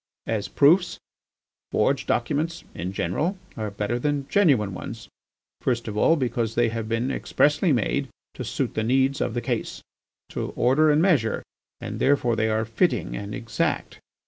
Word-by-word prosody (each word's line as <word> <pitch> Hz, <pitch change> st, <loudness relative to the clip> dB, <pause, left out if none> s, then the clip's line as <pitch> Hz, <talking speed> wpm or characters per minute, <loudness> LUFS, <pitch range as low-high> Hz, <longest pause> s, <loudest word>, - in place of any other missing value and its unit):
As 110 Hz, -2 st, -2 dB
proofs, 175 Hz, +6 st, +4 dB, 0.7 s
forged -, -, +1 dB
documents, 150 Hz, +7 st, -1 dB
in 90 Hz, +3 st, -4 dB
general, 150 Hz, -, -1 dB, 0.2 s
are 110 Hz, -1 st, -3 dB
better 105 Hz, +4 st, -2 dB
than 145 Hz, 0 st, -1 dB
genuine 135 Hz, -, +3 dB
ones, -, -, -7 dB, 0.5 s
first 120 Hz, -3 st, -1 dB
of 105 Hz, -, -4 dB
all 160 Hz, +9 st, +4 dB
because 120 Hz, -5 st, -1 dB
they 120 Hz, -1 st, +3 dB
have 115 Hz, -1 st, -4 dB
been 115 Hz, +4 st, 0 dB
expressly 150 Hz, +5 st, +2 dB
made 135 Hz, +2 st, +1 dB, 0.3 s
to -, -, -6 dB
suit -, -, -2 dB
the -, -, -1 dB
needs 135 Hz, +3 st, +2 dB
of 115 Hz, -, -1 dB
the 120 Hz, -, 0 dB
case, 120 Hz, -3 st, -3 dB, 0.5 s
to -, -, -4 dB
order 135 Hz, +6 st, +4 dB
and 150 Hz, +2 st, +4 dB
measure, 145 Hz, -, +2 dB, 0.4 s
and -, -, -6 dB
therefore 130 Hz, -4 st, +2 dB
they 110 Hz, 0 st, +1 dB
are 110 Hz, +1 st, 0 dB
fitting 110 Hz, -, 0 dB
and 100 Hz, +8 st, -5 dB
exact. 120 Hz, -2 st, -2 dB
120 Hz, 160 wpm, -25 LUFS, 110-145 Hz, 0.7 s, proofs